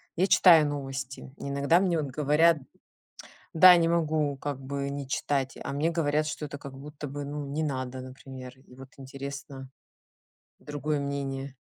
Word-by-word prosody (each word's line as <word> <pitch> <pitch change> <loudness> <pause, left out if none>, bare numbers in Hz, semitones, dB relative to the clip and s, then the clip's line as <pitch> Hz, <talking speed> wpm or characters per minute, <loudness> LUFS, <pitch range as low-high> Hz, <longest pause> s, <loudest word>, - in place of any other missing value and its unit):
я 180 - +3
читаю 165 -6 +7
новости, 135 -2 -5
иногда 140 +4 +2
мне 180 -4 +1
вот 145 - -4
говорят 150 +4 +4 1.0
да, 180 +2 +9
не 170 -1 +3
могу 155 -4 +1
как 140 -1 -4
бы 140 +1 -4
не 140 0 -5
читать, 135 -1 -1
а - - -4
мне 150 +4 +1
говорят, 155 -2 +1
что 150 0 -4
это 145 0 -8
как 140 -1 -9
будто 145 +2 -8
бы, 145 +1 -5
ну, 145 0 -5
не 150 +3 -2
надо, 130 -3 -3
например, 130 0 -10
и 130 - -18
вот 135 +1 -12
интересно 135 0 -8 0.9
другое 145 0 -3
мнение. 140 -1 -4
140 Hz, 160 wpm, -28 LUFS, 135-150 Hz, 1.0 s, да